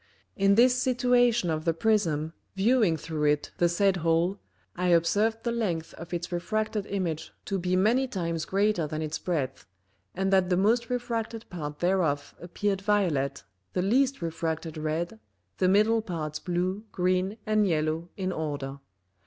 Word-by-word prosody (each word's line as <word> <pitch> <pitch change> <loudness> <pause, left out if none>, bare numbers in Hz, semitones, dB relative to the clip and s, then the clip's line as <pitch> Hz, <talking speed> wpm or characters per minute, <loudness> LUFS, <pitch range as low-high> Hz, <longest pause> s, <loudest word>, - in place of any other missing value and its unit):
In 195 0 +4
this 250 +3 +6
situation 245 -6 +3
of 155 0 -2
the 165 -1 +1
Prism 165 -6 +1 0.2
viewing 205 -4 +3
through 155 0 -3
it 150 0 +1
the 175 - +4
said 190 +2 +2
Hole, 170 +4 +1 0.4
I 180 +1 -1
observed 205 +7 +2
the 235 - 0
length 180 -9 -2
of 170 +1 -10
its 175 +1 -3
refracted 215 +3 -2
Image 170 -5 -3
to 195 -1 -1
be 180 +1 0
many 230 +8 +3
times 170 -8 -2
greater 195 -4 +1
than 155 +1 -3
its 155 +1 -3
breadth, 145 - -3 0.5
and 195 +1 0
that 190 -1 +4
the 180 - +2
most 230 +5 +2
refracted 235 -2 -3
part 150 -4 -6
thereof 170 -6 +1
appeared 195 +3 -2
violet, 165 -10 +1 0.3
the 180 - 0
least 255 +2 +2
refracted 160 -1 -3
red, 155 -3 -3 0.4
the 185 - +3
middle 215 +3 +4
parts 160 -7 -4
blue, 185 +3 -2
green 185 +3 0
and 215 -1 +2
yellow 160 0 -1
in 190 -1 -1
order. 145 -4 -4
180 Hz, 155 wpm, -28 LUFS, 160-210 Hz, 0.5 s, this